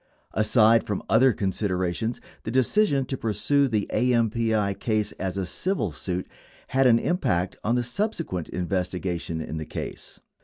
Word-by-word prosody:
Aside 110 +1 +4
from 105 - -3
other 125 +4 +6
considerations, 95 +1 -1 0.2
the - - -5
decision 135 - +2
to 135 - -3
pursue 140 +5 +1
the 110 -5 0
AMPI 115 -4 +2
case 110 -2 0
as 95 0 -2
a 95 - -1
civil 105 - -1
suit 90 +4 -3 0.4
had 135 0 +3
an 115 -2 +6
impact 95 - 0
on 115 +3 +1
the 125 - +1
subsequent 165 - -3
investigation 90 -2 -2
in 80 0 -5
the 80 - -4
case. - - -7
110 Hz, 145 wpm, -25 LUFS, 95-125 Hz, 0.4 s, other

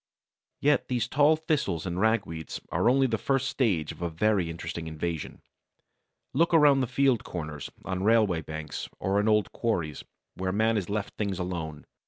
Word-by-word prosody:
Yet 145 +1 +3
these 120 -2 0
tall 145 +4 +4
Thistles 155 - -1
and 90 0 -3
Ragweeds 95 -7 0
are - - +3
only 135 +2 +4
the 115 -4 0
first 135 +2 +1
stage 95 - 0
of - - -12
a 85 - -1
very 95 +1 +1
interesting 80 0 -5
invasion. 80 0 -4 0.9
Look 165 +5 +3
around 145 -3 +6
the 130 - 0
field 130 -2 +2
corners, 75 -4 -6 0.2
on 95 -1 -2
railway 105 -6 +3
banks, 80 -2 -6
or 100 +2 +1
in 105 - +1
old 105 -3 +3
quarries, 85 - -2 0.3
where 95 0 -2
man 110 +3 +2
has 100 -4 -2
left 105 0 -3
things 100 -3 -1
alone. 85 -4 -4
100 Hz, 170 wpm, -28 LUFS, 85-125 Hz, 0.9 s, around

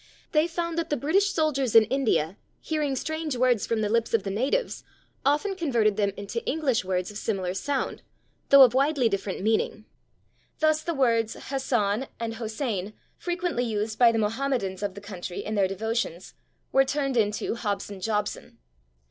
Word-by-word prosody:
They 305 +1 +3
found 335 0 -2
that 335 - -3
the 295 - 0
British 370 +10 +2
soldiers 275 - 0
in 225 - +10
India, 220 - 0 0.2
hearing 300 -3 -1
strange 315 0 -3
words 245 -3 +2
from 225 -1 0
the 210 - +1
lips 230 +1 +1
of 215 - +1
the 195 - -3
natives, 265 - -1 0.4
often 300 +9 +1
converted 240 - +1
them 200 -1 +1
into 200 +4 -4
English 275 -7 +1
words 185 +1 -2
of 210 - -6
similar 190 -5 -2
sound, 275 +7 -2 0.5
though 275 -1 +10
of 245 - +5
widely 275 -2 +3
different 195 -2 -3
meaning. 215 0 0 0.7
Thus 310 0 +2
the 335 0 -3
words 230 -4 +2
/Hassan/ 255 -3 -1
and 230 -1 -3
/Hosein/, 220 -3 -3 0.3
frequently 350 -7 -1
used 215 -2 -2
by 240 -2 +7
the 230 - -1
Mohammedans 220 -3 -1
of 200 -2 -3
the 200 - -8
country 185 -3 -6
in 215 - -3
their 200 -3 +3
devotions, 200 -2 -3 0.4
were 270 - +5
turned 275 -1 -1
into 210 -2 +1
/Hobson 205 -3 -4
Jobson 210 0 -2
230 Hz, 165 wpm, -26 LUFS, 210-280 Hz, 0.7 s, in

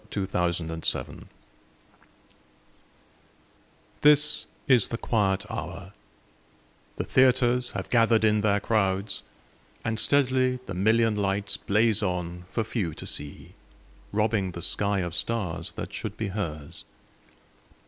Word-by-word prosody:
Sara 100 -2 -1
Teasdale 90 -2 -1
Broadway 80 0 -3 2.8
THIS 150 0 +5 0.2
is 125 -6 +5
the 115 - -4
quiet 100 -5 0
hour; 95 -4 -7 1.0
the - - -2
theaters 125 -1 +3
Have 95 -1 -5
gathered 115 -2 +4
in 105 -1 +3
their 100 -1 +2
crowds, 100 -2 0 0.6
and 110 0 -1
steadily 130 +1 +2
The 95 - -6
million 110 +4 +2
lights 100 0 -1
blaze 110 +1 +2
on 90 -2 -3
for 115 - -1
few 100 -8 -3
to - - -7
see, 75 0 -5 0.6
Robbing 105 -3 0
the 85 - -4
sky 100 +1 +1
of 85 -1 -4
stars 90 -7 -2
that - - -7
should - - -5
be 110 -3 -3
hers. 80 -8 -5
105 Hz, 115 wpm, -26 LUFS, 95-115 Hz, 2.8 s, THIS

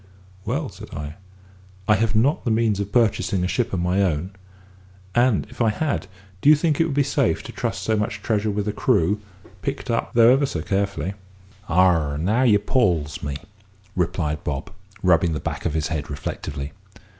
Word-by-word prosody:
"Well," - - -1
said - - -11
I, 75 +1 -6 0.7
"I 110 - +6
have 110 +1 +1
not 140 - +2
the 120 - -1
means 110 -2 +2
of 100 0 -3
purchasing 100 -5 +2
a - - +1
ship 120 +5 -1
of 95 - -1
my 90 +3 +1
own; 90 -1 0 0.8
and 120 -3 +3
if 125 - -7
I 115 - +4
had, 140 +8 -1 0.3
do 145 - +5
you 155 - +9
think 150 0 +1
it - - +4
would 150 -4 -2
be 145 - +4
safe 135 - +1
to - - -8
trust - - -3
so 110 - +1
much 105 0 -2
treasure 110 -1 0
with 105 0 -2
a - - +1
crew, 105 -4 +2 0.4
picked 135 -2 -3
up 115 - -1
though 115 +1 +7
ever 140 +1 +2
so 80 -11 -4
carefully?" 100 -1 -1 0.6
"Ah! 85 -5 +3
now 100 +10 +1
you 115 -6 +5
'pawls 90 - 0
me," 70 -1 -3 0.6
replied 85 -4 -1
Bob, 70 -2 -4 0.3
rubbing 85 -2 +4
the 75 - -2
back - - -3
of 80 - -3
his 80 0 0
head 80 -3 -3
reflectively. 70 0 -5
100 Hz, 190 wpm, -23 LUFS, 85-115 Hz, 0.8 s, you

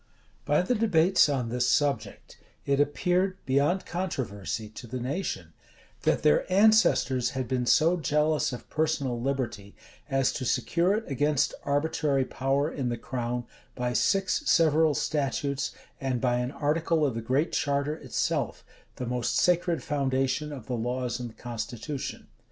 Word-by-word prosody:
By 150 +4 +3
the 215 - +1
debates 190 -7 +4
on 130 -5 -1
this 125 +1 +1
subject, 145 0 -1 0.3
it 140 0 +1
appeared, 180 +6 +1
beyond 145 +8 +1
controversy, 120 - -3
to 115 +3 -10
the 130 +2 -4
nation, 125 - -4 0.5
that - - +1
their 75 - +3
ancestors 190 - +4
had 130 -2 -2
been 125 0 -1
so 165 +6 +4
jealous 150 -1 +1
of 125 - -8
personal 145 -6 -1
liberty, 120 -7 -3 0.3
as 135 -2 +2
to - - -4
secure 170 - +1
it 220 - -2
against 145 +1 +1
arbitrary 145 -1 +1
power 135 +3 0
in 130 -3 -2
the 120 - -2
crown, 120 0 -3 0.3
by 125 0 -2
six[] 195 - +2
several 160 -2 +4
statutes, 140 -1 -1 0.3
and 130 -2 -1
by 120 0 +1
an 125 0 -1
article[] 155 +2 +1
of 135 - 0
the 115 - -4
Great 130 +8 0
Charter 140 +1 0
itself, - - -2 0.3
the 125 - -4
most 120 -1 -1
sacred 175 +1 +2
foundation 135 0 0
of 130 -6 -8
the 125 - -4
laws 125 +1 -2
and 120 -2 -7
constitution. 120 +4 -5
140 Hz, 145 wpm, -27 LUFS, 125-155 Hz, 0.5 s, debates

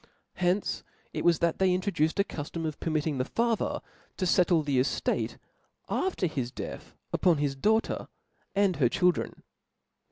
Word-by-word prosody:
Hence 185 +2 +1 0.3
it - - -2
was 170 -2 +5
that 170 0 0
they 190 -1 +4
introduced 185 -3 0
a - - +6
cuilom 165 -2 -5
of 155 -2 -4
permitting 155 -3 -1
the 130 - +1
father 230 - 0 0.4
to 185 - 0
fettle 175 -2 +4
the 140 -3 +1
eftate 130 - 0 0.5
after 370 - 0
his 135 -7 -2
death 130 - -7 0.2
upon 175 -4 +4
his 145 -1 0
daughter, 220 +11 +1 0.5
and 195 -3 +3
her 125 -5 +4
chil 180 +7 +4
dren. 170 - -6
170 Hz, 155 wpm, -29 LUFS, 150-190 Hz, 0.5 s, a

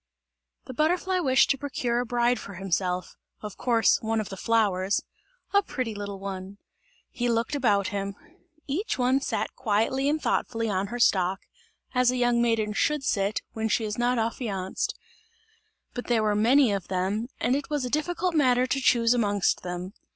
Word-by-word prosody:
The 260 - -8
butterfly 355 +6 +1
wished 270 -4 +4
to 275 - -1
procure 245 -4 -1
a 245 - -2
bride 240 0 +1
for 200 - -9
himself 180 -1 -2 0.2
of 210 -2 -7
course, 235 -3 +3
one 225 0 0
of 215 - -4
the 195 - -6
flowers 200 -2 +1 0.5
a 400 - +6
pretty 255 - -4
little 200 -1 -6
one. 195 0 -6 0.5
He 245 0 -1
looked 230 +4 0
about 210 -8 +2
him. 200 -1 -3 0.5
Each 340 +11 -2
one 255 +2 +2
sat - - -2
quietly 255 +4 +1
and 310 +1 +1
thoughtfully 230 -6 -1
on 190 +1 -1
her 240 +4 -5
stalk, 190 -5 +2 0.5
as 250 -1 +3
a 255 - 0
young 245 -1 +2
maiden 225 -3 +1
should 295 +5 +1
sit, 200 -3 0
when 220 0 -2
she 225 - +1
is 210 +2 -4
not 245 +1 +2
affianced; 220 -5 -2 1.0
but 245 - -6
there 230 -3 +2
were 210 -1 +2
many 240 +4 +4
of 195 -3 -2
them, 195 +5 -1
and 250 - +1
it 285 - -3
was 295 -3 -1
a - - -3
difficult 350 +4 0
matter 255 -5 +3
to 270 +1 -1
choose 235 -2 +4
amongst 205 -5 +1
them. 180 +2 -5
230 Hz, 175 wpm, -26 LUFS, 200-255 Hz, 1.0 s, a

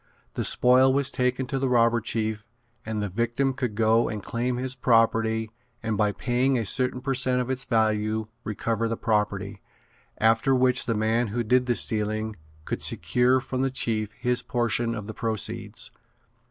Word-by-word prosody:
The - - -2
spoil 130 +1 +5
was 140 0 +2
taken 125 +1 0
to 135 0 -3
the 135 0 0
robber 115 -1 +3
chief 110 -1 -3 0.4
and 110 -1 -2
the - - -1
victim 120 +7 0
could 125 -5 -3
go 115 +1 +3
and 105 -3 -5
claim 120 +4 -2
his 130 +1 -2
property 115 -3 +2 0.3
and 110 -1 -1
by 105 0 +1
paying 125 +4 0
a 115 - -1
certain 125 +3 +1
per 135 +1 -1
cent 130 -1 +1
of 125 +1 -2
its 130 0 -2
value 110 -2 0 0.2
recover 115 +2 -2
the 115 0 -3
property, 105 -2 -1 0.6
after 115 +4 +3
which 125 -1 +2
the 115 - 0
man 110 +3 +1
who 120 +3 -2
did 125 +3 +2
the 120 - +1
stealing 110 0 0 0.3
could - - -4
secure 125 +1 +1
from 130 0 -4
the 135 - +1
chief 110 -5 -1
his 125 0 0
portion 120 -1 -1
of 105 -3 -6
the 110 - -7
proceeds. 110 -4 -3
115 Hz, 175 wpm, -25 LUFS, 110-125 Hz, 0.6 s, spoil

